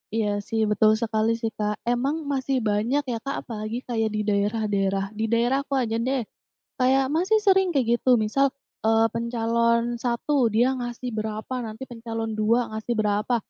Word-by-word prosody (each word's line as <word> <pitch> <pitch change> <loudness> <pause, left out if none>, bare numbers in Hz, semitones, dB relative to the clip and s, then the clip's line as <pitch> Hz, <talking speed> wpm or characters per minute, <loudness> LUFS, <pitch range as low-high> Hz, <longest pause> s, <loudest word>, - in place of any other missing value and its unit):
Iya 215 -2 +1 0.2
sih, 220 -1 +1
betul 215 +1 +4
sekali 220 -1 0
sih, 225 -1 -3
Kak. 210 0 -1
Emang 245 +5 +1 0.2
masih 265 0 0
banyak 235 +8 +1
ya - - -1
Kak, 275 - -3
apalagi 215 0 -4
kayak 225 -3 0
di 215 0 -2
daerah-daerah. 200 -2 0
Di 220 +1 -3
daerahku 265 +4 +1
aja 225 -3 0
deh, 255 -2 -1 0.6
kayak 265 +1 +4
masih 380 +6 +3
sering 385 -1 +4
kayak 260 -5 +1
gitu 255 - +3
misal, 275 +6 +2 0.4
eee, 225 0 +4
pencalon 235 0 +1 0.2
1 245 +1 +1
dia 245 +4 +3
ngasih 240 +1 -4
berapa, 215 +3 -4
nanti 220 +4 -7
pencalon 225 -1 -4
2 225 +3 +3
ngasih 220 +2 -2
berapa. 210 +3 +1
230 Hz, 160 wpm, -25 LUFS, 215-255 Hz, 0.6 s, betul